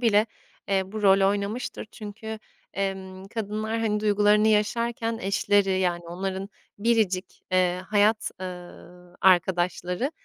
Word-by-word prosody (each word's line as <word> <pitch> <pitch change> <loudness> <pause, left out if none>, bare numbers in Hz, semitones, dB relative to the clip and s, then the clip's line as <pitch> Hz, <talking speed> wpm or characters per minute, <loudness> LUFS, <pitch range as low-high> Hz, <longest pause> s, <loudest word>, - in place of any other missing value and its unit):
bile, 215 -2 +4 0.4
eee, 195 -1 +2
bu 215 -1 -4
rol 195 -1 +5
oynamıştır. 205 +5 -3
Çünkü, 220 +1 -7 0.4
emm, 190 -1 -4
kadınlar, 215 +1 -2
hani, 210 -2 0
duygularını 210 0 +4
yaşarken 225 +2 0
eşleri, 195 0 +2
yani, 175 -2 0
onların 190 +3 -4 0.3
biricik, 205 -4 0
eee, 180 0 +2
hayat, 215 +1 +3
ııı, 180 -1 -10
arkadaşları, 180 - +2
200 Hz, 110 wpm, -26 LUFS, 185-215 Hz, 0.4 s, rol